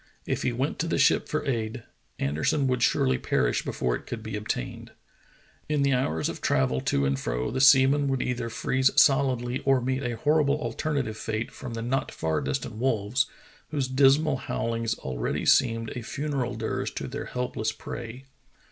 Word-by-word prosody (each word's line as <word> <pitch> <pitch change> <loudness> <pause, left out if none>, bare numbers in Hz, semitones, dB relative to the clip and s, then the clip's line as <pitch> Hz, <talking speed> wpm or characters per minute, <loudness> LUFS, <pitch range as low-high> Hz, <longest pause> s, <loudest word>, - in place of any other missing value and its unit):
If - - -1
he 125 - +1
went 130 +5 -2
to 165 - 0
the - - 0
ship - - +3
for 155 -2 -1
aid, 115 -3 -2 0.3
Anderson 80 - 0
would 125 -2 0
surely 65 - +2
perish - - +1
before 60 -1 -1
it - - -9
could 115 -2 -5
be 110 -1 -5
obtained. 105 - -4 0.8
In 150 -2 +2
the 140 -1 +3
hours 80 -12 0
of - - -5
travel 65 -1 +1
to 70 - +1
and 70 0 0
fro - - -2
the 130 - -1
seaman 135 +1 +6
would 135 -1 0
either 120 -2 -2
freeze 130 +3 +1
solidly 130 -3 +3
or 135 -1 +3
meet 130 +2 -1
a 120 -3 -2
horrible 150 0 +2
alterna 150 -1 -1
tive 110 -3 -6
fate 110 +1 -3
from 120 -2 -7
the 115 - -4
not 130 +3 -1
far 80 -2 -1
distant 70 +10 -3
wolves, 125 +2 +1 0.4
whose 140 -4 -1
dismal 135 +2 +3
bowlings 115 0 -1
already 65 -2 -3
seemed 115 -2 +3
a 125 - -5
funeral 135 0 -3
dirge 110 0 -3
to - - -4
their - - -5
helpless 125 -3 -2
prey. 120 +4 -8
125 Hz, 180 wpm, -27 LUFS, 110-135 Hz, 0.8 s, seaman